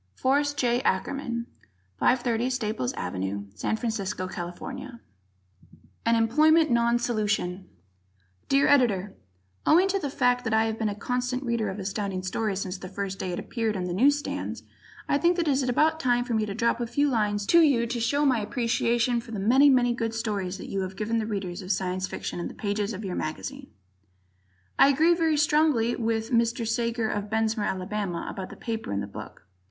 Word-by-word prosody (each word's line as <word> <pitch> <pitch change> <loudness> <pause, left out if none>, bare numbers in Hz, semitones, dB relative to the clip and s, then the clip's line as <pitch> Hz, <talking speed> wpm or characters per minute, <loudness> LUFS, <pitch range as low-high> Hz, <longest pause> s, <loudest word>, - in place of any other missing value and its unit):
Forrest 285 +2 +1
J. 240 -1 +2
Ackerman, 235 +3 -1 0.5
530 245 -1 +2
Staples 245 -1 -2
Ave., 95 +2 -3
San 105 - -2
Francisco, 205 -5 -3
Cal. 175 -1 -5 1.6
An 230 - +4
Employment 305 +7 +4
Non 235 0 +3
Solution 210 -6 -1 0.8
Dear 275 +1 +4
Editor: 210 -9 +3 0.5
Owing 360 +4 +6
to 395 0 +1
the 290 - -3
fact 245 -2 +1
that 225 -1 0
I 220 - +4
have 220 0 -3
been 220 -2 0
a 205 - -4
constant 250 +4 -2
Reader 235 -4 -1
of 190 - -5
Astounding 195 -1 -3
Stories 200 +1 -2
since 185 -1 -4
the 185 - -8
first 195 0 -4
day 185 - -3
it 175 - -3
appeared 225 -1 -2
on 185 - -2
the 180 -1 -3
news 275 +9 +4
stands, 290 - -5 0.4
I 285 - +2
think 345 +2 +3
that 340 -2 0
it - - +4
is 270 0 +2
about 305 +5 +2
time 245 -5 +2
for 245 -1 -4
me 215 -1 +1
to 200 - -4
drop 235 +2 +1
a 235 - -1
few 285 +5 +1
lines 210 -5 0
to 340 - +5
you 270 -7 +4
to 240 +1 -3
show 285 +6 +1
my 260 -4 +3
appreciation 235 +2 0
for 230 - -15
the 220 -3 -4
many, 260 +8 +5
many 245 -2 +4
good 230 -1 -3
stories 200 -5 -2
that - - -8
you 195 - -1
have 190 0 -5
given 225 +1 0
the 215 - -2
Readers 195 -4 -4
of 185 0 -3
Science 185 -1 -1
Fiction - - -5
in 175 - -3
the - - -10
pages 205 0 -2
of 205 +2 -6
your 185 - -3
mag. 155 0 -3 1.4
I - - +8
agree 315 +5 +4
very 325 -3 +1
strongly 295 -6 +3
with 225 0 -1
Mr. 235 -1 +1
Sager 230 0 0
of 205 -1 -3
Bessemer, 220 -1 0
Ala., 190 -1 -3
about 190 -1 -6
the - - -10
paper 225 - -4
in 100 - -1
the 100 - -3
book. 100 - -10
230 Hz, 195 wpm, -26 LUFS, 200-250 Hz, 1.6 s, I